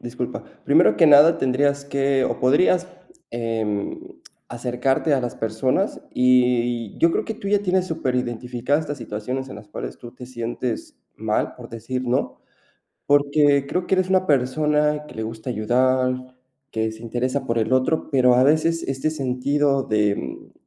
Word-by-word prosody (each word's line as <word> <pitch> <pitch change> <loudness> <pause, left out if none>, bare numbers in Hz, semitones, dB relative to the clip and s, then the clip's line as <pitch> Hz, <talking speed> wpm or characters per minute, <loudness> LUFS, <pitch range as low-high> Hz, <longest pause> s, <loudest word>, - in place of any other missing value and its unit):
disculpa. 120 0 -5 0.2
Primero 105 0 +4
que 160 - +5
nada, 150 +3 +7
tendrías 140 +2 +1
que 135 -1 +1
o - - -2
podrías, 175 +7 +3 0.4
em, 110 -3 -3 0.5
acercarte 125 +5 -1
a 130 - 0
las 120 -1 -4
personas. 130 - -1
Y, 125 -2 +2
yo 165 - +4
creo - - -1
que 220 - -4
tú 200 -2 -6
ya 205 0 +3
tienes 185 -1 +1
superidentificadas 125 -1 -2
estas 145 -1 -6
situaciones 125 +6 -5
en 100 - -9
las 105 -1 -13
cuales - - -7
tú 120 -1 -11
te 125 0 -11
sientes 120 -1 -5 0.2
mal, 110 0 -1
por 120 -2 -11
decir, 125 +3 -5
¿no? 125 +1 -1 0.7
Porque, 145 -1 +3
creo 180 0 -2
que 190 - +2
eres 185 0 +1
una 185 0 +2
persona, 150 +2 +1
que - - -13
le 110 - -4
gusta 110 +2 -6
ayudar, 130 +3 0 0.3
que 110 0 -1
se 110 +1 -12
interesa 125 +4 -2
por 115 0 0
el 110 +3 -1
otro, 130 +6 +1
pero 125 -3 +4
a 125 - +4
veces 160 +3 +2
este 135 +3 -1
sentido 140 0 0
de 105 -3 +1
mm - - -8
130 Hz, 165 wpm, -22 LUFS, 120-145 Hz, 0.7 s, nada